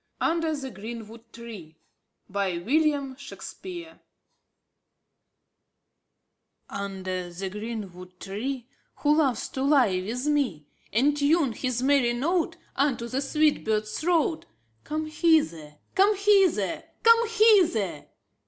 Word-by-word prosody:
Under 330 -1 +1
the 270 -2 -6
Greenwood 225 +2 -9
Tree 210 -9 -10 0.5
'4f 185 -3 -2
William 285 0 +1
Shakespeare 340 +4 -9 2.7
Under 185 -2 -5
the 190 +2 -5
greenwood 195 -4 -7
tree, 240 +6 -4
\ - - -44
Who 295 0 +4
loves 265 -7 +1
to 265 - -5
lie 260 -10 +3
with 245 +7 -4
me, 285 - +1
f^ - - -29 0.3
And 275 +8 +3
tune 290 -1 +2
his 250 +1 -2
merry 265 -3 +3
note 335 +7 0
^^^^.^^ - - -29 0.2
Unto 270 -4 +1
the 255 +3 -2
sweet 300 +1 +2
bird's 215 -1 -1
throat, 325 -1 +1
" 115 0 -42
""" 110 - -41
Come 310 +1 -2
hither, 305 - +1 0.2
come 400 +2 +4
hither, 390 - +3 0.2
come 460 0 +5
hither! 360 - +3
255 Hz, 125 wpm, -26 LUFS, 200-310 Hz, 2.7 s, come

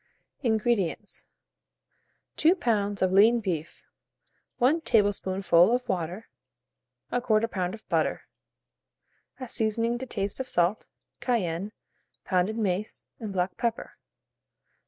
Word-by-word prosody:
INGREDIENTS. 220 - 0 1.1
2 330 +4 +5
lbs. 205 - 0
of 185 - +2
lean 220 +5 +6
beef, 170 -7 -4 0.7
1 280 +7 +3
tablespoonful 195 - +3
of 250 0 -4
water, 180 +4 -3 0.8
1/4 225 -3 +2
lb. 185 -4 -2
of 220 - -18
butter, - - 0 1.2
a 255 - -6
seasoning 230 +1 0
to 260 - -6
taste 200 -1 -3
of 260 -1 -4
salt, 175 +4 +1 0.3
cayenne, 200 -5 -1 0.5
pounded 185 +4 +1
mace, 205 -1 -2
and 215 -3 -5
black 180 0 -1
pepper. 235 -1 -3
215 Hz, 105 wpm, -27 LUFS, 185-235 Hz, 1.2 s, lean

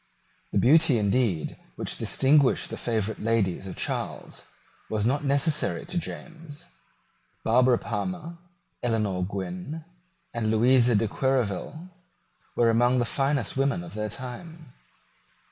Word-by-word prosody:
The - - 0
beauty, 150 0 +5
indeed, 105 -5 0 0.2
which - - -1
distinguished 140 0 +3
the - - -3
favourite 110 -2 -2
ladies 105 -4 0
of 95 - -7
Charles - - -4 0.4
was 110 -1 -1
not 140 +5 +1
necessary 140 +2 +1
to 180 0 -4
James. 165 -2 -9 0.8
Barbara 125 +2 +4
Palmer, 170 - -4 0.4
Eleanor 105 -6 0
Gwynn, 155 - -5 0.5
and 115 -2 -1
Louisa 120 +2 +4
de 110 +2 +2
Querouaille 130 - -1 0.7
were 115 -1 +4
among 120 +2 +3
the 120 - +2
finest 135 -2 0
women 140 +5 0
of 170 - -10
their 105 0 -3
time. 135 - -8
125 Hz, 120 wpm, -26 LUFS, 110-150 Hz, 0.8 s, beauty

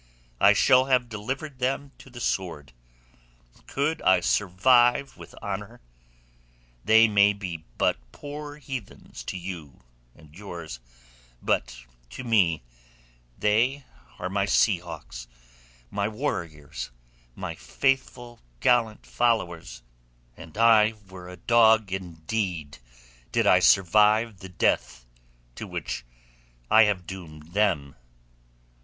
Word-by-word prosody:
I - - +7
shall 130 0 +5
have 125 -2 +1
delivered 130 +6 -5
them 135 +2 -1
to - - -14
the 120 -1 -11
sword. 80 - -3 0.9
Could 145 +4 -1
I 95 - +4
survive 120 +7 +3
with - - -13
honour? 105 +3 -5 1.0
They 110 +1 +6
may 105 -1 +4
be 90 -6 -7
but - - +2
poor 145 - -8
heathens 135 -7 -8
to - - -4
you 85 -8 -8 0.3
and 80 -1 -18
yours, 85 -8 -8 0.6
but - - -2 0.3
to 130 - -8
me 95 - +2 0.7
they 120 +7 +1 0.3
are 90 - -4
my 100 +1 0
sea 100 -1 +3
hawks, 75 -8 -9 0.6
my 100 0 -1
warriors, 85 - -4 0.5
my - - -5
faithful 125 -3 -2 0.2
gallant 115 - +2
followers, 90 - -1 0.5
and 80 +4 -13
I 110 -1 +5 0.2
were 90 -1 -10
a 90 - -10
dog 110 0 +4
indeed 85 - -4 0.5
did - - +1
I - - +6
survive 105 +3 +4
the 95 - -10
death - - 0 0.5
to - - -8
which - - -5 0.7
I 110 0 +8
have 95 -4 -1
doomed 80 -4 -10
them." 90 -10 +1
105 Hz, 110 wpm, -26 LUFS, 85-120 Hz, 1.0 s, I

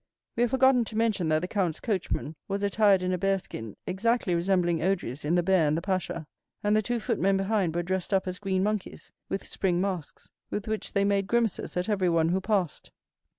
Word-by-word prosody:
We 235 - 0
have 240 - +3
forgotten 260 -1 +4
to 220 - -6
mention, 215 -7 +1
that 155 +1 +2
the - - -1
count's 180 -6 -1
coachman 185 -7 -2
was 200 +1 -2
attired 200 -2 +4
in 185 0 0
a 180 - -1
bear 195 +1 +2
skin, 115 - -8
exactly 200 +1 0
resembling 175 -1 +2
Odry's 160 -7 -1
in 155 +4 +1
The 175 - +3
Bear 180 -3 +3
and 150 +2 +1
the - - -2
Pasha; 185 -4 -2 0.4
and 210 +1 +3
the 215 - +4
two 240 +3 -1
footmen 195 -1 +1
behind 195 -4 0
were 175 - 0
dressed 185 +2 -2
up 190 -1 +2
as 185 0 -4
green 190 -2 0
monkeys, 210 -1 -3 0.2
with 195 - -3
spring 180 -3 0
masks, 185 -5 -4 0.2
with 205 - -4
which 220 0 -3
they 200 -1 +2
made 200 -1 +1
grimaces 230 -5 0
at 180 - -1
everyone 175 -6 +2
who 185 +2 +1
passed. 190 -6 -1
190 Hz, 210 wpm, -28 LUFS, 175-205 Hz, 0.4 s, forgotten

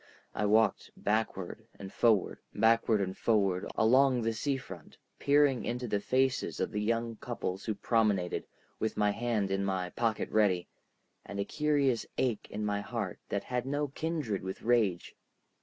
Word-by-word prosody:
I 105 - 0
walked 110 +1 +3
backward 105 -4 -2
and 95 -1 -9
forward, 110 -5 +2 0.2
backward 110 -1 +3
and 95 -1 -2
forward, 100 -4 +1
along 125 +2 +4
the 115 0 0
sea 135 +5 -1
front, 95 - -11 0.2
peering 145 -2 +3
into 125 +1 -3
the 105 -2 0
faces 130 +4 0
of - - -1
the 105 -1 -2
young 115 +1 -1
couples 100 -6 -4
who 110 - -1
promenaded, 105 -4 +1 0.3
with 110 - -2
my 105 -1 +3
hand 110 -3 -1
in 95 0 0
my 95 -2 -1
pocket 115 -2 -1
ready, 95 -5 +2 0.6
and 100 - -7
a 100 - 0
curious 145 -5 +1
ache 120 -5 0
in 105 +1 -3
my 100 -1 0
heart - - -4
that 100 -1 -1
had 125 0 -3
no 145 +1 -1
kindred 145 - -2
with 95 0 -6
rage. 110 -7 +1
110 Hz, 160 wpm, -31 LUFS, 100-125 Hz, 0.6 s, along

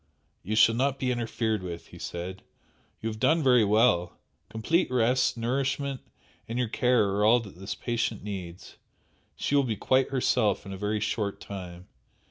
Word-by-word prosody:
"You 105 +5 -3
shall 110 +1 +6
not 135 +3 0
be 130 -1 -1
interfered 115 -3 -1
with," 85 -2 -7
he - - -12
said 90 +2 -6 0.6
"You 115 - 0
have 110 -1 -7
done 160 +6 +3
very 125 -4 +5
well! 105 -4 +2 0.3
Complete 165 +11 0
rest, 125 0 +2
nourishment 135 +3 -1 0.5
and 115 - -3
your 125 -3 0
care 120 -3 +2
are 100 +1 0
all 115 +3 +6
that 100 -5 -12
this 95 - -5
patient 115 -3 -2
needs. 95 -4 -7 0.6
She - - -3
will 140 - +5
be 120 -5 -1
quite 130 +6 +2
herself 125 -7 +1
in 95 - -7
a - - -5
very 105 +2 -1
short 105 -2 -2
time. 90 -3 -8
110 Hz, 170 wpm, -27 LUFS, 100-125 Hz, 0.6 s, shall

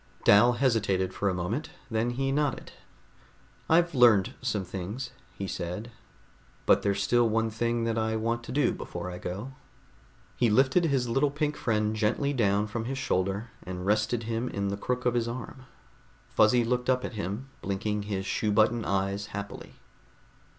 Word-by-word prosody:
Dal 120 +4 +6
hesitated 105 -7 +1
for 100 - 0
a - - 0
moment. 100 - -2 0.2
Then 110 +2 +1
he 135 +2 -1
nodded. 145 -1 -1 1.0
"I've 170 +1 +4
learned 120 -7 +5
some 110 -6 -1
things," 100 +9 -5 0.3
he 100 - -3
said, 90 +7 -5 0.7
"but - - +5
there's 100 -1 0
still 120 +1 +3
one 110 0 +1
thing 115 +1 0
that 115 0 0
I 110 0 0
want 115 +1 -1
to - - -7
do 145 +2 +2
before 90 +1 -6
I 90 - -7
go." 100 +10 -5 0.8
He 120 - +2
lifted 130 +10 +4
his 135 -5 +1
little 135 +5 +2
pink 150 +1 -1
friend 110 -2 0
gently 115 +7 +1
down 105 -4 +2
from 110 +1 -4
his 135 +2 -3
shoulder 100 -3 -1
and 90 0 -6
rested 110 +3 +1
him 115 +2 -2
in 100 0 -2
the 100 - -1
crook 125 +4 -3
of 125 - +3
his 120 -1 0
arm. 130 +2 -7 0.6
Fuzzy 110 +3 +4
looked 125 +2 -1
up 125 0 +2
at - - -5
him, 105 +6 -4
blinking 105 +2 -2
his 100 -2 -3
shoe 105 +2 0
button 110 +2 +3
eyes 100 +1 -1
happily. 100 -1 -7
115 Hz, 170 wpm, -28 LUFS, 100-125 Hz, 1.0 s, Dal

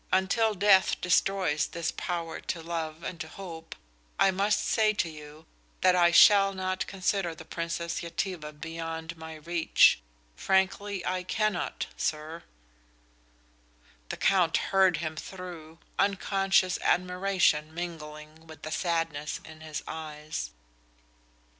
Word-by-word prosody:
Until 210 +4 +2
death 195 0 +4
destroys 180 -3 +2
this 170 -1 -3
power 170 -2 -3
to 165 -2 -4
love 165 -1 -4
and 170 - -5
to 160 - -5
hope 165 -2 -9 0.4
I 195 - +5
must 200 +2 +1
say 215 -1 +3
to 185 -4 0
you 155 0 -11 0.4
that 185 -1 +5
I 175 -1 +5
shall 195 +3 +7
not 185 0 -2
consider 190 -2 -1
the 160 - -11
Princess 170 0 -3
Yetive 165 -3 -4
beyond 165 0 -5
my 160 -1 -9
reach. 165 - +4 0.4
Frankly, 190 0 0
I 185 0 -1
cannot, 215 +1 -1
sir." 155 +2 -3 1.7
The - - -4
Count 180 -4 +3 0.2
heard 190 -3 +5
him 155 -1 -4
through, 170 -2 -9 0.2
unconscious 195 -1 +2
admiration 180 -4 +2
mingling 160 -2 -8
with 160 0 -13
the 155 - -5
sadness 165 -3 -1
in 155 0 -12
his 155 -2 -5
eyes. 150 - -5
170 Hz, 120 wpm, -28 LUFS, 160-190 Hz, 1.7 s, shall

